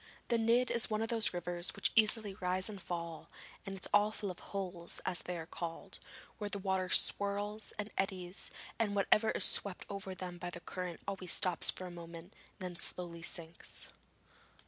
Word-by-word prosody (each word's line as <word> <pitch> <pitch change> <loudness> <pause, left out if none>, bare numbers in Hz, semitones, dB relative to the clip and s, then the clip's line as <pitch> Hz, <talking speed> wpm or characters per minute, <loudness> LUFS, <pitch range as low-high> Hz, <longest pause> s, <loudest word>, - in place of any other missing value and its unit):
The 235 - +4
Nidd 235 +3 +4
is 235 0 +4
one 215 0 0
of 225 - -3
those 225 -2 +4
rivers 175 0 0
which - - +2
easily 215 -2 +4
rise 185 0 +1
and 200 -2 -8
fall, 170 -2 -5 0.4
and 195 0 -4
it - - -5
is 210 +1 +3
full 200 -3 -2
of 180 - -9
'holes,' 180 -3 -4
as 185 -1 +2
they 180 -1 -4
are 165 - -5
called, 165 0 -6 0.4
where 205 -1 -2
the 205 - 0
water 190 -1 0
swirls 205 +2 +3
and 210 0 -4
eddies, 185 -1 -2 0.3
and 210 -3 +1
whatever 210 +2 +4
is - - +3
swept 200 -3 +1
over 195 -1 -4
them 180 -1 -6
by 175 - -4
the 175 - -7
current 180 0 -5
always 190 -3 -2
stops 180 -3 +5
for 185 - -1
a 180 - -6
moment 170 +1 -9 0.3
and 185 -2 -3
then - - -11
slowly 170 -1 -2
sinks. 165 0 -5
185 Hz, 190 wpm, -35 LUFS, 175-205 Hz, 0.4 s, stops